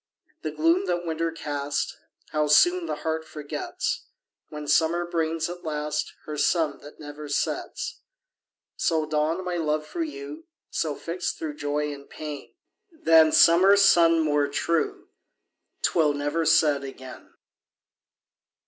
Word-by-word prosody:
The - - -3
gloom 335 +4 +2
that 175 0 -1
winter 165 0 -1
cast, 145 -3 -3 0.4
How 150 0 +1
soon 350 - +4
the - - -2
heart 160 0 -1
forgets, 150 -2 -4 0.4
When 150 -1 -7
summer 165 +4 +2
brings, 165 -1 -1
at 175 0 -8
last, 150 -1 -3
Her 150 -1 -5
sun 160 0 +1
that 145 - -14
never 145 0 -9
sets! 145 - -3 0.7
So 160 -2 +1
dawned 155 +4 -1
my 180 -1 -2
love 155 -2 -1
for 340 - -5
you; 325 0 -8 0.2
So, 155 -3 -1
fixt 175 +4 -4
thro' 155 -2 -4
joy 145 0 -2
and 140 0 -12
pain, 150 -2 -8 0.4
Than 165 - +5
summer 185 +6 +6
sun 170 -4 +5
more 145 -2 +2
true, 160 +3 -1 0.7
'Twill 155 -4 +3
never 145 +3 -1
set 155 -4 +4
again. 130 -1 -10
160 Hz, 130 wpm, -25 LUFS, 150-170 Hz, 0.7 s, summer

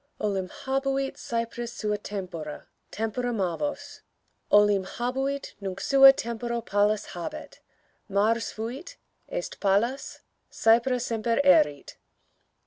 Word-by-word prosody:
_Olim 195 -3 -1
habuit 270 +2 -2
Cypris 235 0 -4
sua 210 -1 -1
tempora: 180 -7 -6 0.2
tempora 225 +3 -2
Mavos 215 - -3 0.5
Olim 205 -2 +5
habuit; 265 +7 -3
nunc 195 -1 -5
sua 270 +5 +8
tempora 235 -1 -3
Pallas 205 -1 +1
habet: 300 - -7 0.5
Mars 220 +4 +1
fuit; 265 - -7 0.3
est - - -5
Pallas; 225 +7 0 0.3
Cypra 235 +3 +3
semper 230 0 -1
erit. 275 - +3
230 Hz, 100 wpm, -27 LUFS, 205-265 Hz, 0.5 s, sua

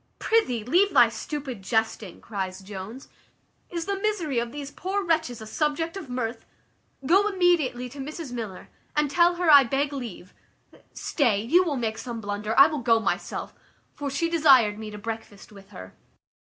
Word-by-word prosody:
"Prithee, 255 - +1
leave 360 - +2
thy - - +7
stupid 275 -8 -6
jesting," 220 -2 -2
cries 190 -3 -5
Jones. 200 +6 -8 0.6
"Is 340 -2 -4
the 395 -1 -2
misery 370 - 0
of 235 0 -3
these 285 0 -7
poor 390 +5 -3
wretches 320 -9 0
a - - -7
subject 305 - -1
of 380 -9 -7
mirth? 235 -2 -3 0.6
Go 390 +7 +4
immediately 345 -11 +1
to 280 +3 -11
Mrs 300 +1 -6
Miller, 220 -6 -6 0.3
and 295 -1 +1
tell 345 +2 +4
her 345 -2 +3
I 285 -2 +9
beg 275 +4 -1
leave 230 -9 -7 0.6
Stay, 225 -9 0
you 345 +11 +4
will 305 -6 -2
make 225 -2 -2
some 240 -2 -6
blunder; 210 +1 -3
I 275 - +11
will 305 -1 -1
go 230 -2 +3
myself; 225 - -3 0.4
for 285 -1 -4
she 330 +5 0
desired 270 -11 +4
me 220 -1 -6
to 210 - -8
breakfast 220 -2 -7
with 195 -1 -15
her." 95 - -11
260 Hz, 170 wpm, -25 LUFS, 220-325 Hz, 0.6 s, I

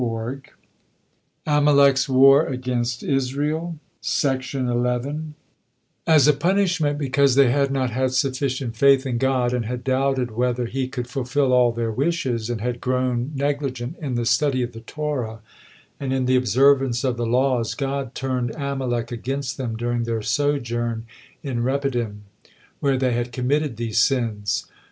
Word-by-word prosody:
AMALEK'S 140 -2 +4
WAR 135 +3 +6
AGAINST 125 -2 -2
ISRAEL 145 +5 -1 2.3
As 155 -4 +6
a 150 - +6
punishment 170 -2 +1
because 140 -2 +2
they 135 -3 +5
had 140 +1 +2
not 130 -2 -1
had 130 +2 0
sufficient 130 -2 -1
faith 135 +2 +4
in 125 -3 -1
God, 130 -2 +1
and 125 -2 -1
had 125 +2 -4
doubted 130 -2 0
whether 125 +2 0
He 130 +2 -2
could 125 -2 -5
fulfill 130 +1 0
all 125 -1 +5
their 115 -1 -2
wishes, 130 -4 -1
and 120 -3 -3
had 120 +1 -3
grown 125 0 -1
negligent 140 -1 -2
in 135 -5 -3
the 120 0 -1
study 130 +2 +2
of 120 - -4
the 115 -1 -10
Torah 125 -4 -4 0.6
and 135 -2 -3
in 130 -1 0
the 130 +1 +3
observance 130 +1 +3
of 130 -2 0
the 120 -1 -2
laws, 125 -1 +1
God 135 -2 -3
turned 130 -2 -2
Amalek 135 -5 -2
against 135 +3 -4
them 120 -5 -3
during 120 0 -1
their 115 -2 -2
sojourn 120 -3 -1 0.4
in 130 -5 -2
Rephidim, 120 -5 -2 0.6
where 135 -2 +1
they 130 -1 +1
had 120 +1 -2
committed 135 +1 -1
these 115 -2 -1
sins. 115 -5 0
130 Hz, 140 wpm, -22 LUFS, 120-140 Hz, 2.3 s, WAR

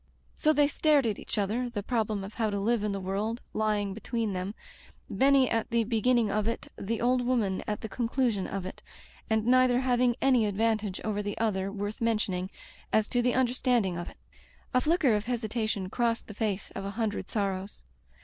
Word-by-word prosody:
So 310 - +3
they 290 -1 +4
stared 295 -2 +3
at 215 -3 -1
each - - -5
other, 220 +5 0
the 210 -4 -4
problem 215 -3 -1
of 195 +2 -8
how 225 -2 0
to 200 -1 -2
live 220 +2 +1
in 210 - 0
the 200 - -2
world 200 +5 -2
lying 210 -2 0
be 215 - -8
tween 225 -2 -2
them, 185 +3 -3 0.6
Benny 265 +5 +4
at 225 -1 -1
the 235 -1 +2
beginning 230 0 +2
of 215 +1 0
it, 230 - -2
the 220 +2 -3
old 250 +1 +2
woman 230 -7 0
at 210 - -2
the - - -4
conclusion 230 -2 0
of 195 -2 -4
it, 185 - -8 0.5
and 220 -1 +1
neither 255 0 +4
having 245 -1 +2
any 255 -5 +3
advantage 215 -1 0
over 210 -1 -1
the 205 0 -4
other 195 -3 0
worth 205 +2 -5
mentioning, 210 -5 0 0.4
as 215 0 +3
to 245 - +2
the 245 0 +1
understanding 245 -6 +2
of 175 0 -5
it. - - -15 0.6
A 255 - +4
flicker 310 -5 +3
of 210 0 0
hesitation 220 -4 -2
crossed 235 -1 0
the 210 - -9
face 205 -2 -2
of 195 - -6
a 195 - -3
hundred 220 -3 -2
sorrows. 195 -1 -3
220 Hz, 195 wpm, -29 LUFS, 205-245 Hz, 0.6 s, they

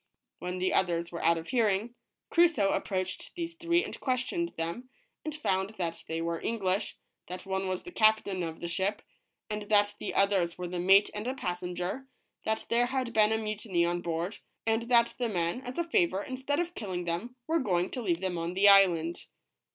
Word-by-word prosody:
When 180 +1 -4
the 185 +1 0
others 170 -2 +1
were 170 - -5
out 170 0 +4
of 165 - -7
hearing, 225 -2 +1 0.4
Crusoe 325 - +4
approached 185 -1 -3
these 335 -1 -4
three 340 +1 +1
and - - -7
ques 255 -1 +1
tioned 340 +5 -3
them, 170 +11 -4 0.3
and 310 -1 -3
found 190 -7 -1
that 170 -3 -3
they 165 0 -2
were 170 0 -2
English, 200 -2 -1 0.3
that 180 +2 -7
one 190 0 -2
was 185 -1 -2
the 355 - -9
captain 215 - +3
of 165 -1 -5
the 170 - -3
ship, 190 +4 -1 0.4
and 210 -1 -3
that 205 -1 +4
the - - -4
others 195 -4 +2
were 180 - -4
the 175 0 -4
mate 195 +3 +5
and 210 +3 -4
a 260 - -1
passenger, 180 +4 -3 0.4
that 220 0 -1
there 240 +1 +3
had 255 -2 -2
been 215 0 +5
a 220 - +2
mutiny 215 -5 -1
on 175 0 -1
board, 170 +4 -3 0.3
and 225 0 +2
that 235 -1 +5
the 240 -2 0
men, 175 +3 -1
as 250 -1 -7
a 340 - +2
favor, 190 - +1
instead 265 +3 -2
of 350 0 -2
killing 185 - -4
them, 175 +9 -3
were 325 +1 +1
going 180 - 0
to 250 - -4
leave 175 -5 0
them 185 -2 -1
on 170 +2 -3
the 200 +2 +5
island. 175 -4 +5
195 Hz, 200 wpm, -30 LUFS, 175-240 Hz, 0.4 s, mate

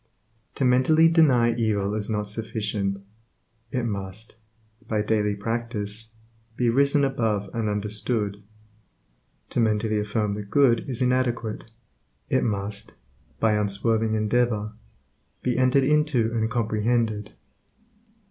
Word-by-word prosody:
To 135 - 0
mentally 130 +6 +5
deny 135 -8 +4
evil 105 -3 0
is 105 0 -3
not 105 -1 -1
sufficient; 105 -2 -2 0.7
it 120 +1 -2
must, 100 +1 -5 0.5
by 105 -1 0
daily 105 -1 +1
practice, 110 0 -3 0.5
be 120 -1 +2
risen 140 +3 +3
above 110 -7 0
and 115 -2 -1
understood. 105 0 -1 1.1
To - - -1
mentally 110 -1 +1
affirm 105 0 -1
the 105 - -4
good 120 +3 +2
is 125 -1 -2
inadequate; 120 -3 -1 0.6
it - - +3
must, 100 -2 -3 0.4
by 110 -1 +3
unswerving 110 +2 +1
endeavor, 110 -1 0 0.7
be 125 -1 0
entered 130 +2 +3
into 145 -5 +2
and 110 -1 0
comprehended. 110 -1 0
110 Hz, 110 wpm, -25 LUFS, 105-120 Hz, 1.1 s, mentally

